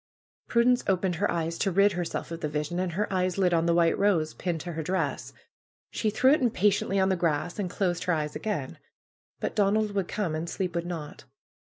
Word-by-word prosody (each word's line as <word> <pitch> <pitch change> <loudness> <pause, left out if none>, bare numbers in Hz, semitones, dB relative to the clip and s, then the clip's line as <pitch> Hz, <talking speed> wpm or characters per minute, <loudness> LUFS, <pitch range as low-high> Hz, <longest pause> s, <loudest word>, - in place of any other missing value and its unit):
Prudence 245 +1 +3
opened 185 -2 +1
her - - +1
eyes 165 0 -2
to 195 - +1
rid 200 +3 +4
herself 175 -2 -4
of 165 0 -6
the 150 - -1
vision, 150 +4 -2
and 185 -2 -1
her 210 +5 0
eyes 185 -1 0
lit 180 -2 +2
on 165 0 +2
the 170 - +3
white 170 -1 +4
rose 180 -6 +2
pinned 175 -3 -3
to 175 - -5
her 160 - -3
dress. 185 +4 -2 0.6
She 220 - 0
threw 260 +5 +4
it 305 - +2
impatiently 205 -4 +2
on 190 0 +3
the 190 - +2
grass, 170 +1 -1
and 190 -3 -1
closed 175 -2 -1
her 180 - +2
eyes 150 -2 -2
again. 185 -12 -3 0.6
But - - -3
Donald 210 +1 +2
would 195 -3 -1
come 195 -7 -2
and 160 +2 -3
sleep 180 -1 -3
would 170 0 -2
not. 160 -4 -7
180 Hz, 215 wpm, -27 LUFS, 165-200 Hz, 0.6 s, rid